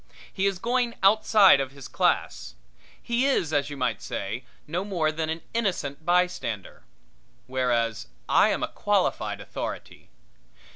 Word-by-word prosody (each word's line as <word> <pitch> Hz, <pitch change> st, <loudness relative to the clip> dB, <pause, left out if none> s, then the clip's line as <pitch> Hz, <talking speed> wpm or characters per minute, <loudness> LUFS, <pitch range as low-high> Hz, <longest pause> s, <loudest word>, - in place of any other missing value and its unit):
He 195 Hz, 0 st, +1 dB
is 195 Hz, -2 st, -1 dB
going 240 Hz, +3 st, 0 dB
outside 200 Hz, -4 st, +6 dB
of 135 Hz, -1 st, -3 dB
his 140 Hz, -2 st, -10 dB
class. -, -, -1 dB, 0.4 s
He 240 Hz, +3 st, 0 dB
is, 170 Hz, -, +1 dB
as 145 Hz, 0 st, +1 dB
you 145 Hz, -, -7 dB
might 125 Hz, -5 st, -1 dB
say, 105 Hz, +6 st, -4 dB, 0.2 s
no 170 Hz, +5 st, -2 dB
more 175 Hz, -6 st, 0 dB
than 160 Hz, 0 st, -3 dB
an 160 Hz, 0 st, -4 dB
innocent 180 Hz, -10 st, -2 dB
bystander. 175 Hz, -, -1 dB, 0.6 s
Whereas 120 Hz, -4 st, -1 dB, 0.2 s
I -, -, +5 dB
am -, -, -1 dB
a -, -, 0 dB
qualified -, -, 0 dB
authority. -, -, -7 dB
160 Hz, 140 wpm, -26 LUFS, 130-195 Hz, 0.6 s, outside